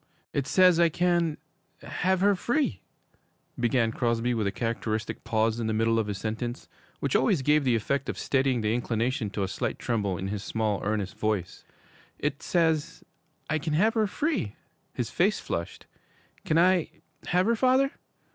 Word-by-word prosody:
'It 140 -1 -1
says 180 0 +5
I 170 -1 +5
can 170 -1 +1 0.5
have 185 +1 0
her 205 +1 +5
free,' 235 - -1 0.8
began 120 -1 +2
Crosby, 120 0 0
with 110 -3 0
a - - 0
characteristic 110 -1 -3
pause 110 +1 +1
in 115 - -1
the 110 - 0
middle 115 +1 +2
of 110 - -1
his 105 -2 -3
sentence, 115 +4 -4 0.3
which 140 - -1
always 180 - +3
gave 150 +2 +3
the 125 -3 +2
effect 135 +5 -1
of - - -3
steadying 130 -3 +1
the 105 0 +1
inclination 120 0 -1
to 100 0 -3
a - - -1
slight 95 - -3
tremble 100 -6 -1
in 95 0 -4
his 105 0 -4
small, 110 -3 -1
earnest 105 -1 -2
voice; 105 -5 -2 0.5
'it - - -2
says 160 -3 0 0.4
I 155 0 0
can 155 0 -3
have 210 +9 +3
her 220 -3 +2
free.' 265 - -2 0.4
His - - -3
face - - +2
flushed. 85 0 -5 0.6
'Can 155 - +2
I 180 0 +4 0.4
have 180 +1 +2
her, 230 +2 +3
father?' 260 +3 +3
125 Hz, 170 wpm, -27 LUFS, 110-170 Hz, 0.8 s, says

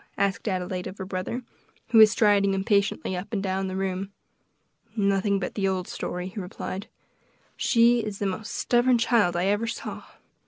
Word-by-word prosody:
asked 200 +2 0
Adelaide 185 -1 -2
of 190 - -8
her 190 - -5
brother, 185 +6 -4 0.5
who 225 -1 +5
was 215 -1 +9
striding 205 -3 +3
impatiently 200 -1 0
up 180 +4 -6
and 200 -3 -2
down 190 0 -1
the 185 - -4
room. 190 0 -2 0.8
"Nothing 200 -1 +2
but 195 - -4
the 195 -2 0
old 185 -1 -1
story," 180 +1 -4
he 200 - -7
replied; 190 +1 -6 0.7
"she 235 0 +4
is 210 -3 -4
the 200 - -2
most 195 +3 -3
stubborn 245 +1 +2
child 230 -6 +2
I 175 +1 +1
ever 205 +3 +1
saw. 225 - -6
195 Hz, 170 wpm, -26 LUFS, 185-215 Hz, 0.8 s, was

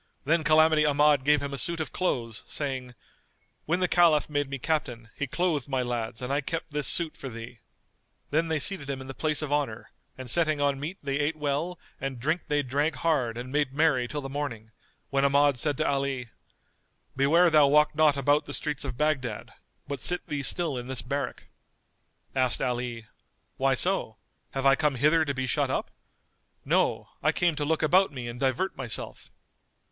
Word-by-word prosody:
Then 160 +3 +2
Calamity 155 0 +5
Ahmad 145 -1 +4
gave 145 0 +3
him 140 0 -4
a 140 - -2
suit 170 +7 -1
of 160 - -3
clothes, 115 - -2
saying, 130 -4 -4 0.7
"When 175 +4 0
the 180 - +3
Caliph 165 -4 +4
made 145 -1 0
me 140 - -3
captain, 120 -6 -2
he 145 - -3
clothed 155 -3 -1
my 130 -2 0
lads 120 -1 -4
and 130 +2 -2
I 145 - +1
kept 165 +3 -4
this 150 0 +1
suit[FN#225] 165 -3 -1
for 135 - -6
thee." 115 0 -9 0.7
Then 160 +3 +2
they 160 -1 0
seated 145 -1 -1
him 135 -1 -3
in 130 - -8
the 135 - -7
place 155 +2 0
of 145 -1 -2
honour 135 -7 -2 0.3
and 130 -1 -7
setting 155 +2 +2
on 140 -1 +1
meat 160 +7 -5
they 140 0 -1
ate 150 +2 0
well 150 +4 -2 0.2
and 135 -2 -4
drink 160 +7 -1
they 145 -1 +1
drank 145 +4 0
hard 130 -5 0
and 125 +1 -6
made 145 -2 0
merry 145 -5 +2
till 145 +3 -4
the 135 - -5
morning, 125 -6 -5 0.4
when 135 0 +2
Ahmad 140 -1 +3
said 145 +1 0
to - - 0
Ali, 135 -3 -1 0.9
"Beware 165 +6 +4
thou 150 -2 +6
walk 150 +2 +4
not 150 -1 +3
about 145 +2 +2
the - - -2
streets 150 -2 -3
of 130 -4 -5
Baghdad, 135 -7 -1 0.3
but 140 0 -4
sit 175 0 +1
thee 145 -1 -3
still 150 -1 0
in 120 - -8
this 130 -1 -2
barrack." 140 +2 -3 0.9
Asked 130 -2 +1
Ali, 120 -2 -3 0.5
"Why 135 0 +2
so? 175 - 0 0.4
Have 135 0 -2
I 135 - +7
come 150 0 +1
hither 155 +5 +3
to 140 - -1
be 130 0 -1
shut 125 - 0
up? - - -2 0.7
No, - - +1
I - - +3
came 175 -3 +1
to 150 - -2
look 160 +1 0
about 185 +4 +4
me 130 -4 -6
and 120 +1 -7
divert 135 +9 0
myself." 125 -5 -5
145 Hz, 195 wpm, -27 LUFS, 130-155 Hz, 0.9 s, I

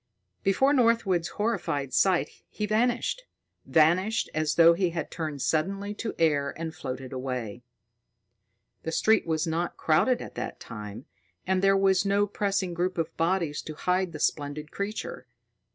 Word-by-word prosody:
Before 265 +9 +3
Northwood's 230 -9 +2
horrified 145 - -2
sight, 190 -2 +3 0.2
he 210 - -3
vanished; 240 - +1 0.5
vanished 185 +8 +3
as 155 0 0
though 170 0 +7
he 180 +1 +1
had 165 -1 -4
turned 155 -5 -4
suddenly 195 +6 -1
to 220 +1 -5
air 145 -4 +1
and 160 -1 -4
floated 130 -2 -6
away. 125 -4 -4 1.2
The 160 - -4
street 220 +3 +3
was 160 0 0
not 170 +1 -2
crowded 235 +11 +2
at - - -8
that - - -5
time, 105 +2 -8 0.4
and 190 0 +1
there 195 0 +4
was 190 -1 +3
no 200 +1 +2
pressing 200 -3 -1
group 180 +1 -1
of 165 0 -2
bodies 165 -3 0
to 155 - -8
hide 180 +2 0
the 155 - -7
splendid 150 +1 -2
creature. 200 - -5
170 Hz, 150 wpm, -27 LUFS, 155-200 Hz, 1.2 s, though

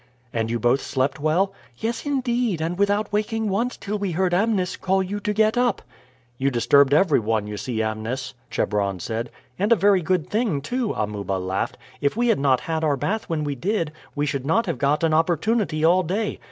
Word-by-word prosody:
"And 115 -1 -1
you 120 0 -1
both 120 +4 +2
slept 135 +3 -1
well?" 175 +7 +1 0.2
"Yes, 235 - -3
indeed, 245 - 0
and 165 +2 -1
without 205 +1 +1
waking 215 +1 0
once 230 +6 -1
till 205 +1 -4
we 195 -3 -2
heard 180 +1 +1
Amnis 190 -1 +1
call 190 0 +1
you 200 +3 -4
to 210 - -1
get 215 +3 +2
up." 245 -4 +1 0.6
"You 135 +1 +2
disturbed 140 +3 +4
everyone, 115 - +3
you 105 0 -5
see, 110 +2 -2
Amnis," 115 +5 -3 0.2
Chebron 100 -3 -1
said. 115 +6 -3 0.3
"And 205 +4 +1
a - - +8
very 195 -1 +4
good 175 -1 0
thing 215 - 0
too," 240 - -2
Amuba 105 -2 -2
laughed. 95 0 -2 0.2
"If 140 +7 0
we 240 0 +2
had 225 - +3
not 135 -2 +3
had 160 -1 -2
our 145 -3 +2
bath 215 +10 -2
when 160 -2 -1
we 145 -1 -1
did, 170 - -1 0.2
we 145 0 0
should 140 -2 -2
not 165 +11 +2
have 170 - -3
got 145 +3 +1
an 160 -1 +3
opportunity 170 +1 +1
all 180 +3 +5
day. 200 +5 -2
165 Hz, 200 wpm, -23 LUFS, 130-210 Hz, 0.6 s, a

